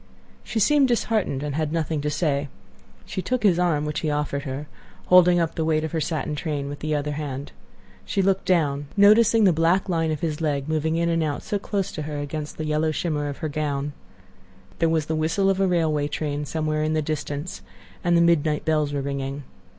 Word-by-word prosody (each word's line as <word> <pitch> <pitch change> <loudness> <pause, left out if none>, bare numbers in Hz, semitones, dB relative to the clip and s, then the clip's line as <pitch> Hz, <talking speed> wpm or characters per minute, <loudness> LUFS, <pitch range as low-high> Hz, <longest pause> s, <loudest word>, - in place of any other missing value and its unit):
She 225 - -2
seemed 275 +6 +4
disheartened, 220 - 0
and 145 -1 -3
had 155 0 -1
nothing 160 -2 -1
to 150 - -1
say. 145 -2 0 0.6
She 185 - -4
took 255 +4 -2
his 180 -4 +4
arm, 160 -4 +1
which 150 0 -2
he 155 - -1
offered 145 -1 -2
her, 135 +2 -4 0.4
holding 180 -1 +6
up 165 -1 0
the 160 - -2
weight 155 -1 +1
of 160 - -3
her 160 - -1
satin 155 0 -2
train 145 -2 -3
with 145 - -6
the 155 0 -1
other 150 0 -2
hand. 145 -2 -5 0.5
She 195 - 0
looked 195 0 +1
down, 145 -5 +1
noticing 220 +2 +6
the 185 -4 +5
black 165 +5 +2
line 165 -3 0
of 155 -2 -2
his 160 -2 -2
leg 145 -3 -1
moving 160 0 0
in 170 0 +1
and 165 -1 +1
out 150 -2 -2
so 205 -2 -2
close 195 -1 -2
to 155 - -5
her 150 0 -4
against 145 +1 -5
the 155 - -3
yellow 155 +1 +1
shimmer 150 -2 -1
of 140 - -6
her - - +1
gown. 145 -1 -2 0.9
There 165 - +3
was 160 -2 +1
the 160 - -2
whistle 165 +5 +1
of 190 - -1
a 195 - +3
railway 160 -5 +1
train 145 0 -3
somewhere 155 0 -1
in 155 0 0
the 155 -1 +1
distance, 150 +1 -4 0.4
and 175 -1 +3
the - - +4
midnight 160 -3 +2
bells 155 -2 +1
were 140 - -1
ringing. 140 0 -4
155 Hz, 215 wpm, -24 LUFS, 145-170 Hz, 0.9 s, holding